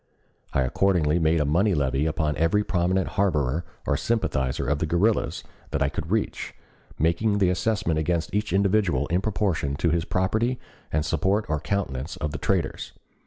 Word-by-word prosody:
I 70 - +1
accordingly 80 +3 +2
made 80 0 +2
a 75 - +1
money 90 +7 +2
levy 70 +1 +1
upon 75 -1 0
every 85 +6 +2
prominent 95 -1 +1
harborer 85 -5 0 0.2
or - - +1
sympathizer 70 - -1
of 75 +1 +1
the 80 - -1
guerrillas 100 +7 +1 0.3
that 70 - 0
I 70 - +1
could 80 +1 -5
reach, 110 +2 -2 0.4
making 85 +7 +1
the 95 -3 +3
assessment 90 -4 0
against 80 0 -1
each 105 -1 -1
individual 95 -7 +2
in 90 +3 +1
proportion 95 -9 -1
to 85 +3 +1
his 85 0 0
property 110 +7 0 0.3
and 75 0 0
support 95 +7 +1
or 75 0 0
countenance 80 -6 -3
of 75 - -3
the - - -5
traitors. - - -1
85 Hz, 165 wpm, -25 LUFS, 75-100 Hz, 0.4 s, the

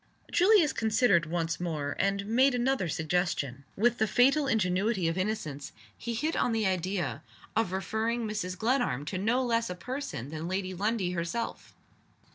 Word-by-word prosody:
Julius 365 -4 +5
considered 220 -7 +3
once 165 0 -2
more; 155 -5 -2
and 195 0 +1
made 250 +5 +3
another 245 -6 +1
suggestion. 155 -5 -1
With 240 +3 +2
the 220 - +3
fatal 275 +6 +4
ingenuity 195 -3 +1
of 165 - 0
innocence, 160 -8 -3 0.2
he 235 -1 -4
hit 310 +8 -1
on 245 - +1
the 220 -1 +1
idea 185 -4 -1 0.3
of 225 -5 +1
referring 220 +5 -1
Mrs. 185 -4 -3
Glenarm 220 - 0
to 180 +4 -3
no 240 +6 +1
less 230 -2 +1
a 180 - -4
person 250 - -5
than 160 +2 -5
Lady 185 0 -2
Lundie 200 0 0
herself! 180 +7 -4
200 Hz, 155 wpm, -29 LUFS, 175-235 Hz, 0.3 s, Julius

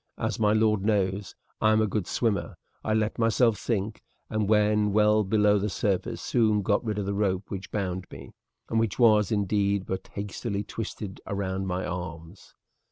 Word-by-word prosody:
As - - -2
my 105 -1 +3
lord 110 -1 +3
knows, 100 -3 0 0.3
I 110 - +4
am 110 - +4
a 110 - +3
good 100 -3 -2
swimmer. 110 -4 -1 0.3
I 110 - 0
let 110 0 0
myself 115 0 +3
sink, 110 -1 -2 0.3
and 110 -2 0
when 105 -1 +3
well 105 0 +4
below 105 0 +3
the 105 +2 -1
surface 95 -1 -1
soon 110 -4 +2
got 100 +4 +1
rid 110 -3 -2
of 100 - -2
the 100 - -1
rope 100 -1 -1
which 95 0 -5
bound 95 -3 -3
me, 70 -1 -10 0.4
and 115 - +1
which 115 -3 0
was, 110 -4 +4
indeed, 100 -1 +1
but 95 - -4
hastily 100 +1 -3
twisted 105 -2 -6
round 95 -1 -2
my 90 0 -2
arms. 90 0 -7
105 Hz, 175 wpm, -27 LUFS, 95-110 Hz, 0.4 s, I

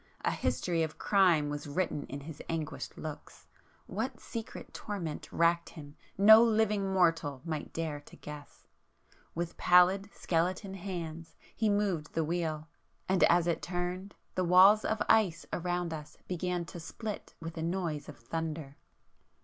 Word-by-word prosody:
A - - +1
history 170 -2 0
of 160 -1 -2
crime 180 -7 +4
was 145 0 -5
written 150 0 -2
in 140 +1 -6
his 150 +1 -9
anguished 160 -2 -4
looks,... - - -8 0.4
what - - -3
secret 230 -2 -7
torment 175 -7 -5
racked 170 0 +2
him 145 -3 -11 0.2
no 220 +3 +9
living 215 -3 +2
mortal 165 -7 +2
might 155 -3 -4
dare 160 -3 -3
to 145 - -15
guess! 150 -1 -11 0.7
With 170 0 -3
pallid 185 +3 +5
skeleton 185 +4 -1
hands 170 -4 -6 0.2
he 220 -1 +1
moved 200 -7 0
the 165 - +2
wheel;—and 165 +2 -2
as 170 0 +4
it 170 -1 0
turned, 180 +2 -4 0.2
the 185 - 0
walls 185 +4 +7
of 220 - 0
ice 205 -7 +3
around 175 -1 -1
us 150 -2 -8
began 180 -1 -2
to 170 - -9
split 210 +6 -6
with 165 0 -7
a 160 - -4
noise 165 -3 -2
of 150 - -10
thunder. 155 +2 -5
170 Hz, 145 wpm, -31 LUFS, 160-190 Hz, 0.7 s, no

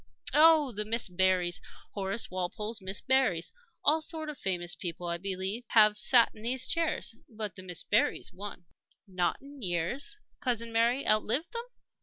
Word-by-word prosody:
Oh, 305 -2 +6
the 210 -1 -2
Miss 225 +2 0
Berrys! 180 -1 +1 0.3
Horace 195 +1 -2
Walpole's 210 +4 -3
Miss 190 +1 +1
Berrys. 260 -11 +1 0.3
All 310 +2 +4
sorts 315 -1 -2
of 290 - -13
famous 175 -2 0
people, 175 0 -5
I 170 0 -2
believe, 195 +4 -3
have 215 -2 +5
sat 235 +3 +4
in 215 - -12
these 250 +3 0
chairs. 330 -7 -1 0.2
But 215 -5 -6
the - - -8
Miss 180 -3 -1
Berrys 210 +4 +1
won." 195 -2 -8 0.4
"Not 180 -2 -1
in 280 -1 -12
years? 190 - -2 0.2
Cousin 230 -2 -2
Mary 235 +4 +1
outlived 215 +9 +2
them." 470 0 -4
215 Hz, 160 wpm, -30 LUFS, 185-260 Hz, 0.4 s, Oh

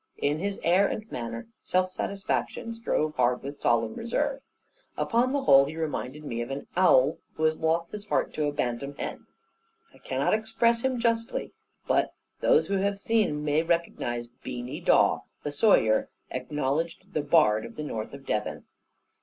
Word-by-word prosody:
In 145 +2 0
his 200 +2 -2
air 185 +4 +4
and 215 - -4
manner, 115 -1 -5 0.2
self 185 0 +1
satisfaction 185 - -2
strove 155 -9 -1
hard 125 0 +2
with 140 +1 -7
solemn 115 -2 +2
reserve. 270 +4 -1 0.6
Upon 245 +2 +2
the 280 0 0
whole 135 - +7
he 155 +3 -7
reminded 150 -2 -3
me 120 -5 -3
of 120 - -4
an 135 +1 -4
owl 160 -5 +5 0.2
who 155 - -3
has 155 0 +2
lost 165 +1 0
his 210 0 -7
heart - - 0
to 150 -1 0
a - - 0
bantam 140 +1 -3
hen. - - -6 0.7
I - - -18
cannot - - 0
express 225 +2 +2
him 260 0 0
justly; 230 -1 -1 0.3
but - - +1 0.2
those 480 -2 +4
who 200 - 0
have 200 +1 0
seen 200 -9 +1
may 150 +1 +3
recognise 165 -8 -1
Beany 120 +1 -7
Dawe, - - +4 0.2
the 145 - -2
sawyer, 145 - +3 0.2
acknowledged 150 +8 -2
the 150 - +1
bard 145 -8 +4
of - - -9
the 150 - -5
north 110 -7 -4
of 140 -1 -13
Devon. 105 -3 -2
155 Hz, 170 wpm, -27 LUFS, 130-200 Hz, 0.7 s, whole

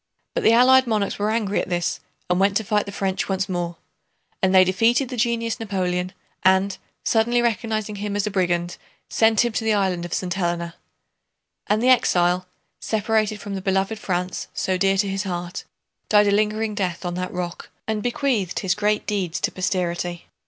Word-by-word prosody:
But - - -1
the 225 - +6
Allied 260 +2 +6
monarchs 210 -4 -1
were 205 +1 +1
angry 215 -2 0
at - - -6
this 175 -1 -1 0.3
and 180 0 +1
went 195 +1 +3
to 220 - -2
fight 210 0 0
the - - -5
French 195 -1 -2
once 190 +1 0
more. 175 -2 -3 0.7
And 190 - +3
they 185 - +8
defeated 230 +8 +2
the 255 - -4
genius 230 0 0
Napoleon 185 -4 -2 0.3
and, 190 +1 +3 0.3
suddenly 235 +2 +2
recognizing 220 -3 -1
him 205 0 -3
as 205 0 0
a 210 - -2
brigand, 175 -2 0 0.3
sent 225 +1 +4
him 240 - 0
to 225 - -1
the 220 -1 +2
island 190 -4 0
of 175 - -3
St. 180 -1 -2
Helena. 170 -2 -2 0.9
And 215 +3 +1
the 255 - +4
exile, 180 -7 +3 0.3
separated 215 -1 0
from 205 0 -6
the 195 - -3
beloved 195 +3 0
France 180 -2 -3
so 190 - 0
dear 195 +1 +2
to 200 +1 +2
his 195 0 -2
heart, 175 -3 -5 0.4
died 210 -1 +5
a - - +2
lingering 215 +1 +1
death 185 -3 -3
on 175 - -2
that 185 +1 -3
rock 175 -1 -5 0.2
and 220 -1 -1
bequeathed 240 - -1
his 190 -3 +1
great 210 +1 0
deeds 185 -5 -2
to - - 0
posterity. 175 -2 -2
200 Hz, 190 wpm, -23 LUFS, 180-220 Hz, 0.9 s, they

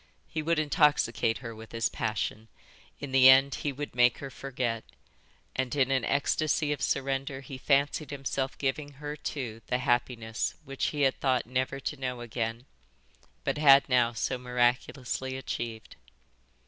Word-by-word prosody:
He 155 - -3
would 165 +1 +1
intoxicate 145 -7 +2
her 115 - -5
with 110 0 -12
his 115 -1 +1
passion. 110 0 -3 0.5
In 140 -2 -6
the 130 0 +8
end 135 +1 +6
he 145 - -1
would 145 +2 -6
make 125 -1 +4
her 135 -1 -7
forget. 125 -4 -3 0.7
And 130 +1 -1
in 135 -2 +2
an 130 -3 +2
ecstasy 150 +2 +1
of 145 - -7
surrender 135 0 -1
he 135 0 -9
fancied 140 +1 +1
himself 135 -1 -3
giving 145 +1 -2
her 145 +2 -6
too 125 -6 -5
the 125 - +1
happiness 120 -3 -1
which 135 -1 -3
he 150 - -2
had 135 - +2
thought 130 -2 +1
never 130 +2 -2
to 150 - -3
know 125 -2 -4
again, 115 +1 -3 0.8
but - - -1
had 140 -2 +7
now 125 -2 +3
so 125 +2 -2
miraculously 125 +1 -1
achieved. 115 -3 -5
130 Hz, 155 wpm, -29 LUFS, 120-140 Hz, 0.8 s, the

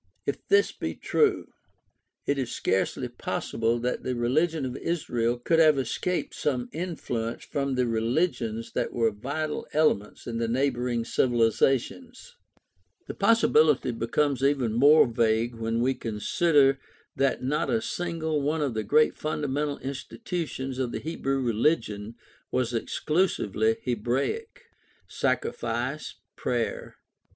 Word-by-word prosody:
If - - -4
this 405 +1 +4
be - - -5
true, 435 -3 +1 0.8
it 140 -1 0
is 125 -3 -2
scarcely 95 - 0
possible 115 +1 -2
that 125 +1 -1
the 130 - -2
religion 145 +6 +1
of 125 -1 -4
Israel 120 -8 -1
could 165 +7 +1
have 155 -3 +6
escaped 170 +7 -2
some 125 -4 -1
influence 125 -9 -3
from 140 -2 -2
the 125 0 +2
religions 115 0 -1
that - - -2
were 115 -2 +2
vital 145 +9 -4
elements 145 -10 +1
in 115 -1 -3
these 115 -1 -1
neighboring 120 -2 0
civilizations. 130 - 0 0.7
The - - -6
possibility 155 - +4
becomes 130 +4 0
even 135 -5 +2
more 145 +7 +7
vague 115 -1 +1
when 115 0 -2
we 130 +2 +2
consider 135 +5 +2 0.4
that 135 -1 +1
not 145 +4 0
a 230 - +2
single 165 -8 -2
one 150 +2 0
of 135 -4 -1
the 110 - -1
great 150 +9 +3
fundamental 145 -1 -2
institutions 135 - -5
of 125 -2 -1
the - - -3
Hebrew 135 -4 -2
religion 115 -3 0 0.3
was 125 -1 -1
exclusively 115 - 0
Hebraic. 135 - -2 0.4
Sacrifice, - - -2 0.2
prayer. - - -2
130 Hz, 125 wpm, -27 LUFS, 115-155 Hz, 0.8 s, more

